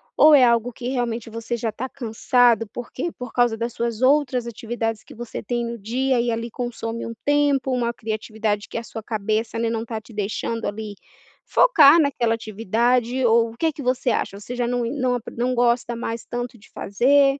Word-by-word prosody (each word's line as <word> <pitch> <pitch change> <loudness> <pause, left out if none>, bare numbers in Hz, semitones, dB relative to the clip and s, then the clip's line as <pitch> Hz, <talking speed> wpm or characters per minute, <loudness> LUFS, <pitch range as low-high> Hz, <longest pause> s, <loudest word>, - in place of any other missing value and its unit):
Ou 305 0 +7
é 265 - +7
algo 235 0 +3
que 245 +1 -5
realmente 240 -3 -2
você 230 +1 -4
já 225 -1 -2
tá 255 +5 -5
cansado 235 -1 +2
porque 255 +7 -5
por 250 -5 -9
causa 240 -2 +2
das 235 +1 -3
suas 235 -1 -3
outras 260 -3 +3
atividades 225 -1 -3
que - - -14
você 240 0 -6
tem 240 -1 -2
no 235 - -4
dia 245 +4 0
e 240 - -1
ali 230 +1 -3
consome 230 -1 -4
um 230 - -5
tempo, 285 -2 +2
uma 240 -2 0
criatividade 215 -2 -3
que - - -5
a 230 - -3
sua 225 - -7
cabeça, 220 +1 -2
né, 230 - +1
não 225 -1 -2
tá 225 -1 -5
te 220 +2 -16
deixando 215 +2 -3
ali 210 0 -4 0.5
focar 320 - +6
naquela 250 -6 +2
atividade? 230 +4 0
Ou 230 0 +4
o - - -18
que 325 +3 +1
que 285 - -8
você 255 -1 +1
acha? 200 - -2
Você 240 +4 -7
já 245 -1 0
não 245 0 0
não 255 0 0
ap 240 - -4
não 250 +2 0
gosta 240 0 +2
mais 230 0 -4
tanto 245 0 -5
de 200 - -19
fazer? 275 +6 +3
235 Hz, 200 wpm, -23 LUFS, 225-250 Hz, 0.5 s, Ou